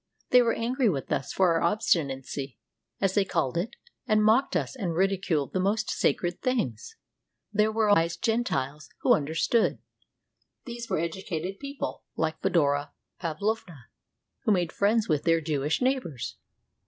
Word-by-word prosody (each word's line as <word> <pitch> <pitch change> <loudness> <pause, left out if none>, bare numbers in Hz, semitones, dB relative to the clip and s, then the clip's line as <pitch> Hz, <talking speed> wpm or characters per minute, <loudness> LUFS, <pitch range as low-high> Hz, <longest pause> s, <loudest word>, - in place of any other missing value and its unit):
They 250 - +8
were 230 -2 +2
angry 245 +1 +1
with 140 -8 -3
us 130 - -1
for 185 -2 +3
our 165 - +1
obstinacy, 140 - 0 0.4
as 195 -1 +1
they 205 - +3
called 165 -8 -1
it, 175 +6 -2 0.3
and 215 -2 +3
mocked 230 +6 +3
us - - -1
and 185 -10 -2
ridiculed 185 -6 0
the 185 - +1
most 200 +4 0
sacred 175 0 0
things. 140 - -2 0.6
There 210 +1 +3
were 220 -1 +1
wise 165 -3 +3
Gentiles 150 - -1
who - - +5
understood. 160 +10 +1 0.9
These 240 -1 -7
were 185 - +1
educated 170 +2 -3
people, 280 0 -5
like 160 0 -1
Fedora 145 -3 +1 0.3
Pavlovna, 180 - -3 0.5
who - - 0
made 180 -4 +1
friends 215 +2 +2
with 150 -4 +1
their 165 -1 +3
Jewish 150 - -1
neighbors. 250 - -1
185 Hz, 145 wpm, -27 LUFS, 155-220 Hz, 0.9 s, They